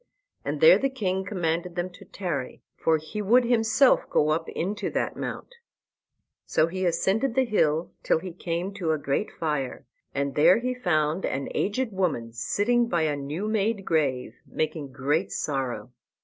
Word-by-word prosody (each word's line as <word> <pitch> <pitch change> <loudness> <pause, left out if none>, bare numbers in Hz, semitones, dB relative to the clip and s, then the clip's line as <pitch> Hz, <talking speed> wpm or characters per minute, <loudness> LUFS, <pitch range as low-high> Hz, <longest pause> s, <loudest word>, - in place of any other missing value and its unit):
And - - -3
there - - +8
the 275 - +1
king 190 -7 -1
commanded 175 -2 -2
them 180 +1 -2
to 180 - -14
tarry, 145 -10 -4
for 160 -1 +2
he 155 +8 -6
would 235 +5 +5
himself 235 +2 +3
go 150 - +2
up 160 +2 0
into 195 +5 -2
that - - -2
mount. - - -6 0.9
So 155 - +2
he 185 +2 -2
ascended 210 +9 +1
the 265 -1 +3
hill 160 -8 +1
till - - +2
he 185 +2 -6
came 175 +2 -3
to 175 -5 0
a - - 0
great 145 +7 -1
fire, 150 -6 -3 0.3
and 140 0 -2
there 165 +6 +6
he 250 +2 -1
found 165 -7 0
an 135 0 -2
aged 225 +4 -1
woman 160 - -1
sitting 230 - +1
by 170 -5 +1
a 150 -2 +1
new 145 +8 -4
made 215 -1 0
grave, 135 -6 0
making 155 -3 -3
great 145 +7 0
sorrow. 130 -6 -3
175 Hz, 165 wpm, -26 LUFS, 150-210 Hz, 0.9 s, there